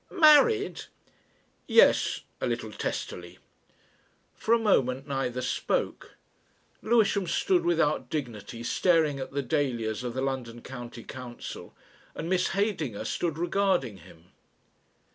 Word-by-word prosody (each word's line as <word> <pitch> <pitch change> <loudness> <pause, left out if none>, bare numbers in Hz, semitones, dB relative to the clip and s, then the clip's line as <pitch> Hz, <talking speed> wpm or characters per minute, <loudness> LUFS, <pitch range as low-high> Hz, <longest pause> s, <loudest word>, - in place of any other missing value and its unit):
"Married!" 385 +6 +5 0.8
"Yes," 470 - +4 0.2
a - - 0
little - - -3
testily. - - -5 1.0
For 220 - -3
a 235 - +7
moment 135 - +1
neither 130 -2 -2
spoke. 125 - -2 0.7
Lewisham 210 -4 +2
stood 175 +1 +2
without 165 -3 +1
dignity 120 -5 -5
staring 155 +3 +2
at 130 - -5
the 140 0 -2
dahlias 120 -5 -1
of 120 -1 -4
the 130 - -1
London 125 -3 -4
County 120 -2 -8
Council, 125 -2 -9 0.4
and - - -5
Miss 185 0 +2
Heydinger 190 - -1
stood 165 -3 -2
regarding 175 - 0
him. 85 -1 -18
140 Hz, 115 wpm, -28 LUFS, 120-185 Hz, 1.0 s, a